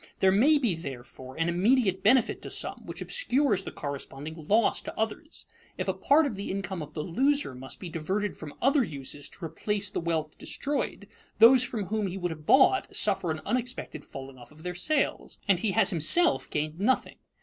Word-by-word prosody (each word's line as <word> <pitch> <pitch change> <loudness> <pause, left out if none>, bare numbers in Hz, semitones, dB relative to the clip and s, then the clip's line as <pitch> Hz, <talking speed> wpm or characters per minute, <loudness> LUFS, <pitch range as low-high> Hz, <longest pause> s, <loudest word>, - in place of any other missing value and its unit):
There 190 - +4
may 270 +11 +5
be, 240 -9 +1
therefore, 130 -4 -9
an 165 +1 0
immediate 190 +3 +2
benefit 245 +2 +3
to - - -7
some, - - -4
which - - -5
obscures 275 - +1
the - - -7
corresponding 145 +2 -7
loss 220 +2 +3
to - - -8
others. 225 +9 -4 0.3
If - - -3
a - - +1
part 300 +3 +3
of 275 - -2
the 200 0 -6
income 190 -2 -3
of 150 0 -9
the 150 - -2
loser 270 - +1
must 130 +1 -8
be 185 - -7
diverted 185 +6 -2
from 150 -2 -9
other 275 +1 +4
uses 145 - -7
to 175 - -8
replace 205 +4 -2
the - - -2
wealth 160 -2 -2
destroyed, 275 -7 -3 0.3
those 235 +3 +8
from 225 -5 -3
whom 210 +2 -1
he 185 +1 -5
would 175 -2 -2
have 155 -1 -9
bought 285 +9 +4
suffer 195 -4 +2
an 155 0 -3
unexpected 245 - -3
falling 135 -1 -10
off 120 0 -14
of 155 +1 -16
their 180 0 -3
sales, 285 - 0
and 190 -3 +3
he 200 0 0
has - - +4
himself 195 - +3
gained 155 +2 -3
nothing. 250 +6 0
190 Hz, 195 wpm, -28 LUFS, 155-240 Hz, 0.3 s, those